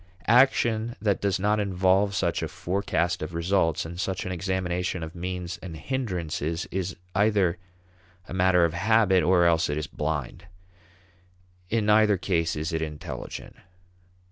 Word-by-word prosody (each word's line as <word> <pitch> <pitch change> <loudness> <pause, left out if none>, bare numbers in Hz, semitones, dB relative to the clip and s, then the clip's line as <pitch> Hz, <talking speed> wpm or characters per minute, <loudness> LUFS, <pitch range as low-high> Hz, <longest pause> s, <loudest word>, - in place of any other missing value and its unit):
Action 120 -1 +3
that 105 -2 0
does 100 -2 0
not 105 +2 +2
involve 95 0 +2
such 85 -4 0
a - - -2
forecast 90 -2 -1
of 80 +2 -5
results 85 -2 +1
and 85 +2 -7
such 95 -1 -2
an 95 - -3
examination 90 -1 -2
of 80 +1 -7
means 90 0 -5
and 85 -4 -7
hindrances 85 - -3
is 95 0 -3 0.2
either 100 -4 +2 0.7
a - - -8
matter 90 -1 +4
of 80 - -1
habit 100 0 +3
or 90 -1 +4
else 85 -2 +3
it 75 - -1
is 75 - -2
blind. 75 +2 -4 1.2
In 110 -1 +1
neither 105 -1 +4
case 85 -3 0
is 80 +2 -3
it 80 - -1
intelligent. 75 -2 -6
90 Hz, 145 wpm, -26 LUFS, 85-100 Hz, 1.2 s, matter